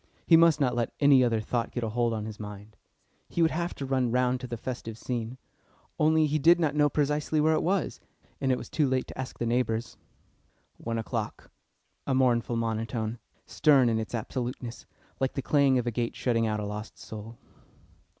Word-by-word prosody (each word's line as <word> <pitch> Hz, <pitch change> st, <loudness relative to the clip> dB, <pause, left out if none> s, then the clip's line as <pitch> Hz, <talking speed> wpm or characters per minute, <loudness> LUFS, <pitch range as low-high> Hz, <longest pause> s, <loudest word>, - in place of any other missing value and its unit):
He 165 Hz, -, +6 dB
must 165 Hz, -1 st, +6 dB
not 130 Hz, -4 st, +2 dB
let 120 Hz, -2 st, -1 dB
any 140 Hz, -3 st, +6 dB
other 115 Hz, -2 st, +2 dB
thought 115 Hz, +2 st, -2 dB
get 120 Hz, -, -4 dB
a 110 Hz, -, -1 dB
hold 120 Hz, +1 st, 0 dB
on 110 Hz, -2 st, -3 dB
his 110 Hz, -1 st, -8 dB
mind. 105 Hz, 0 st, -9 dB, 0.5 s
He 170 Hz, -, +1 dB
would 160 Hz, -, +3 dB
have 170 Hz, +2 st, -2 dB
run 130 Hz, -2 st, 0 dB
round 125 Hz, 0 st, +1 dB
to 130 Hz, -, -5 dB
the 120 Hz, -1 st, -5 dB
festive 115 Hz, -2 st, -6 dB
scene, 120 Hz, 0 st, -4 dB, 0.6 s
only 155 Hz, 0 st, +4 dB
he 155 Hz, +1 st, 0 dB
did 170 Hz, +4 st, +6 dB
not 155 Hz, -4 st, +1 dB
know 150 Hz, 0 st, +3 dB
precisely 150 Hz, +1 st, 0 dB
where 155 Hz, +1 st, +4 dB
it -, -, +1 dB
was, 185 Hz, 0 st, -1 dB, 0.4 s
and 135 Hz, -, +2 dB
it 130 Hz, -, +2 dB
was -, -, -8 dB
too 150 Hz, -3 st, +1 dB
late 130 Hz, 0 st, 0 dB
to -, -, -9 dB
ask 130 Hz, 0 st, -5 dB
the 120 Hz, -, -2 dB
neighbours. 115 Hz, -1 st, -1 dB, 0.8 s
One 115 Hz, 0 st, -3 dB
o'clock! 110 Hz, -, -4 dB, 0.6 s
A 135 Hz, -, +1 dB
mournful 120 Hz, -2 st, +2 dB
monotone, 115 Hz, 0 st, -2 dB, 0.3 s
stern 140 Hz, -5 st, +4 dB
in 110 Hz, -1 st, +1 dB
its 110 Hz, +2 st, -4 dB
absoluteness, 120 Hz, +1 st, -5 dB, 0.3 s
like 135 Hz, 0 st, 0 dB
the 135 Hz, -, -3 dB
clang 140 Hz, -2 st, +3 dB
of 125 Hz, -, 0 dB
a 120 Hz, -, 0 dB
gate 115 Hz, +1 st, -2 dB
shutting 115 Hz, -2 st, +1 dB
out 105 Hz, -1 st, -1 dB
a 105 Hz, -, -3 dB
lost 105 Hz, +1 st, -6 dB
soul. 110 Hz, +1 st, -9 dB
125 Hz, 200 wpm, -28 LUFS, 115-140 Hz, 0.8 s, He